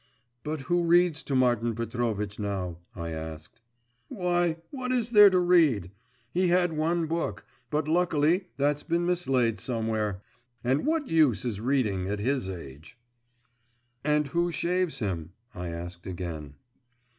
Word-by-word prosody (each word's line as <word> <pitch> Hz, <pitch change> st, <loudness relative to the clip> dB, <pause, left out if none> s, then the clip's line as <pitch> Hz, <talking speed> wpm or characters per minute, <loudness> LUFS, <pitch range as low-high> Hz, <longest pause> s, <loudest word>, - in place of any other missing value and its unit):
'But 155 Hz, -1 st, -3 dB
who 175 Hz, +6 st, +1 dB
reads 170 Hz, -2 st, +4 dB
to 140 Hz, -, -3 dB
Martin 120 Hz, -3 st, +2 dB
Petrovitch 115 Hz, -3 st, -2 dB
now?' 95 Hz, -5 st, -3 dB, 0.2 s
I 85 Hz, -1 st, -5 dB
asked. 80 Hz, +7 st, -8 dB, 0.5 s
'Why, 175 Hz, -2 st, 0 dB
what 255 Hz, -2 st, -3 dB
is 240 Hz, -2 st, 0 dB
there 210 Hz, -3 st, +9 dB
to 185 Hz, -, +2 dB
read? 160 Hz, -, +3 dB, 0.4 s
He 185 Hz, +1 st, +2 dB
had 175 Hz, -1 st, +3 dB
one 165 Hz, +2 st, 0 dB
book 160 Hz, -, -3 dB, 0.2 s
but, 150 Hz, 0 st, -1 dB
luckily, 170 Hz, +1 st, +2 dB
that's 145 Hz, +1 st, +1 dB
been 170 Hz, 0 st, 0 dB
mislaid 135 Hz, -11 st, +1 dB
somewhere.… 110 Hz, -5 st, -2 dB, 0.4 s
And 130 Hz, -, +1 dB
what 315 Hz, -3 st, 0 dB
use 150 Hz, -7 st, +3 dB
is 110 Hz, -4 st, -3 dB
reading 110 Hz, -8 st, 0 dB
at 105 Hz, +1 st, -1 dB
his 125 Hz, -1 st, -1 dB
age.' 80 Hz, -, -9 dB, 1.1 s
'And 150 Hz, 0 st, +2 dB
who 170 Hz, +4 st, +1 dB
shaves 180 Hz, 0 st, 0 dB
him?' 85 Hz, -7 st, -3 dB, 0.2 s
I 90 Hz, 0 st, -5 dB
asked 85 Hz, +1 st, -7 dB
again. 85 Hz, -6 st, -6 dB
135 Hz, 140 wpm, -28 LUFS, -, 1.1 s, there